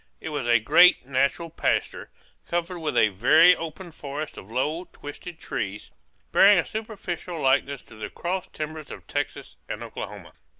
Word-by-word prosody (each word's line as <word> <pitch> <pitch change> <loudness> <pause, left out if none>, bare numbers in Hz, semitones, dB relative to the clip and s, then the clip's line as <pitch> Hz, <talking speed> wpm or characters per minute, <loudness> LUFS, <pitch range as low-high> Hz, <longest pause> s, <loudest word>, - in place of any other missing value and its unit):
It - - -6
was 145 -5 -3
a 120 0 +6
great 125 +7 +5
natural 140 +5 0
pasture, - - -1 0.4
covered 175 +1 -2
with 155 -2 -2
a 110 - +5
very 155 - +6
open 165 +2 -7
forest 150 0 -6
of 95 - -11
low, 150 +9 -1
twisted 165 +1 -10
trees, 100 +1 -5 0.4
bearing 200 +1 +7
a 175 - +2
superficial 190 -6 -5
likeness 135 0 +1
to - - -17
the 110 - -6
cross 180 +1 -3
timbers 155 -1 -6
of - - -10
Texas - - -4
and - - -4
Oklahoma. - - -8
155 Hz, 160 wpm, -25 LUFS, 135-175 Hz, 0.4 s, bearing